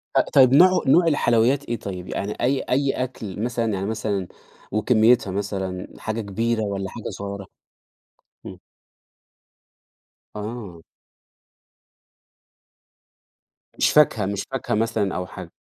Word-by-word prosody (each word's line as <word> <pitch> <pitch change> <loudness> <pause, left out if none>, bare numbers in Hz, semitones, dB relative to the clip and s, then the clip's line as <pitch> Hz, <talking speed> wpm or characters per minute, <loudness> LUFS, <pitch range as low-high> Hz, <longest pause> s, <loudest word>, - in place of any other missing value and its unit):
أ - - +6
طيب 130 -2 +6
نوعه 185 +5 +6
نوع 170 +5 +5
الحلويات 130 -1 +2
إيه 120 -1 -3
طيب؟ 90 -3 -6
يعني 105 +2 -3
أي 130 +2 +2
أي 135 +2 +1
أكل 110 -5 -6
مثلًا 115 -3 -1
يعني 95 0 -2
مثلًا 105 -3 -2 0.4
وكميتها 110 0 +3
مثلًا، 95 -2 -4
حاجة 110 +1 -3
كبيرة 115 +3 -1
والّا 100 -2 -3
حاجة 115 - -7
صغيرة؟ 100 0 -6 1.0
إمم. - - -9 1.8
آه. 105 -5 -7 3.0
مش - - +3
فاكهة 135 -9 +4
مش 100 0 -2
فاكهة 135 -5 -2
مثلًا 110 -3 0
أو 90 - -3
حاجة؟ 90 -3 -10
110 Hz, 115 wpm, -23 LUFS, 100-120 Hz, 3.0 s, أ